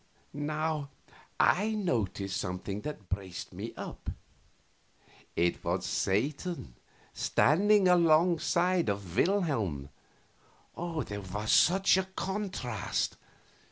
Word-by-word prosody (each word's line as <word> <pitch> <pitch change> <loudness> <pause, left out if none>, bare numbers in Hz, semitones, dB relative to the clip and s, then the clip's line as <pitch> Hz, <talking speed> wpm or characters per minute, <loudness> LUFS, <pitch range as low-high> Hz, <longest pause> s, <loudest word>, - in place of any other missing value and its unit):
Now 150 0 -2 0.5
I 215 +4 +3
noticed 105 - -1
something 95 +3 -4
that 140 -9 -7
braced 95 -1 -5
me - - -5
up. - - -6 1.3
It 85 0 +1
was - - -1
Satan 140 - -1 0.4
standing 200 +6 +4
alongside 175 0 +3
of 100 -3 -4
Wilhelm! 115 - +1 0.9
And 165 -2 -3
there 105 0 -5
was 105 +3 -3
such 190 +2 +5
a 190 - +1
contrast! 190 - -2
150 Hz, 90 wpm, -30 LUFS, -, 1.3 s, such